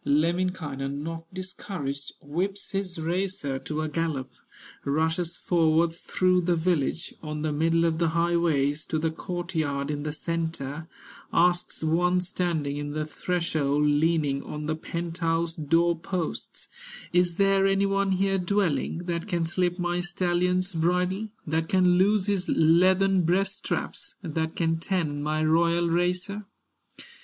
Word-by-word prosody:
Lemminkainen, 150 -3 0
not 165 0 -6
discouraged, 185 -6 -5
Whips 185 +7 -3
his 195 -3 -3
racer 170 -4 -2
to 155 +2 -3
a - - -1
gallop, 155 -4 -2 0.5
Rushes 160 +4 0
forward 165 -1 +2
through 185 +1 +1
the 175 0 +2
village, 165 -1 0
On 150 -1 -4
the 155 - 0
middle 165 +3 +2
of 165 -1 +1
the 170 - +3
highways, 160 -3 +1
To 160 - -1
the 160 +1 0
court 175 +2 -5
yard 145 -3 -1
in 145 -1 -3
the 150 0 -3
centre, 160 -1 -3 0.4
Asks 175 -1 +2
one 175 +3 +2
standing 170 -6 -1
in 145 0 -4
the 155 0 -2
threshold, 155 -3 0
Leaning 150 -2 +2
on 150 0 -6
the 155 +1 -1
penthouse 165 0 -2
door 165 +3 +2
posts: 170 0 -5 0.5
"Is 175 -1 +3
there 195 0 +4
any 195 0 +3
one 195 -1 +1
here 195 +1 +1
dwelling 175 -4 0
That 170 +1 -2
can 175 -4 0
slip 175 +1 0
my 175 -1 -1
stallion's 180 +1 0
bridle, 180 +5 +1 0.2
That 160 +1 -1
can 180 -1 +4
loose 200 0 +3
his 195 -2 0
leathern 185 +4 +4
breast 190 +3 +1
straps, - - -4
That 160 -1 -2
can 165 -1 +1
tend 160 -5 -1
my 155 +1 0
royal 170 +2 +3
racer?" 180 +4 0
170 Hz, 140 wpm, -27 LUFS, 155-180 Hz, 0.5 s, there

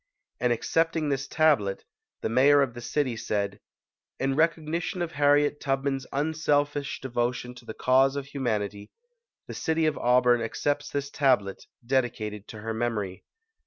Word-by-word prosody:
In 125 -1 +1
accepting 160 +6 +1
this 135 -1 -1
tablet, 140 -12 +2 0.4
the - - -1
mayor 140 +4 +5
of 130 -3 -3
the 120 - -8
city 125 +1 -1
said, 100 -2 -2 0.6
"In 135 0 0
recognition 165 +4 0
of 170 - -4
Harriet 145 0 +3
Tubman's 135 -1 -1
unselfish 145 -1 0
devotion 125 -1 -2
to 125 -1 -14
the 110 - -7
cause 135 +2 +3
of 140 0 -5
hu 140 - -7
manity, 105 -5 -2 0.6
the - - -6
city 160 0 0
of 155 -1 0
Auburn 125 -1 +4
accepts 145 +5 -1
this 140 0 -3
tablet 125 -9 +1 0.2
dedicated 115 -5 -1
to 110 - -9
her 110 +1 -3
memory". 110 -5 -3
135 Hz, 150 wpm, -27 LUFS, 115-145 Hz, 0.6 s, mayor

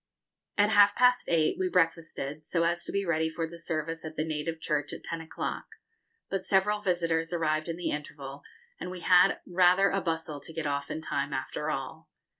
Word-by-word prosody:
At 205 +1 +4
half 205 -1 +6
past 250 0 +4
eight 160 -2 +2
we 185 -1 +1
breakfasted, 165 -4 0
so 165 +2 0
as 170 +1 0
to - - -4
be 200 0 -1
ready 160 -2 +1
for 165 +1 -3
the 170 +1 -10
service 165 0 -3
at 160 0 -7
the 155 - -1
native 160 +1 -3
church 150 -3 -1
at - - -8
ten 165 -1 -4
o'clock; 160 - -5 0.6
but 195 -1 -2
several 205 +2 +2
visitors 165 -4 0
arrived 155 -2 0
in 165 - -2
the 175 - -2
interval, 145 -2 -6 0.4
and - - -5
we 180 -1 -7
had 180 0 +5
rather 185 +2 +4
a 195 - 0
bustle 160 -3 -3
to 165 - -9
get 160 -1 -4
off 140 -1 -2
in 160 - -4
time, 140 -2 -2
after 150 +3 -3
all. 135 -3 -5
165 Hz, 200 wpm, -29 LUFS, 155-180 Hz, 0.6 s, half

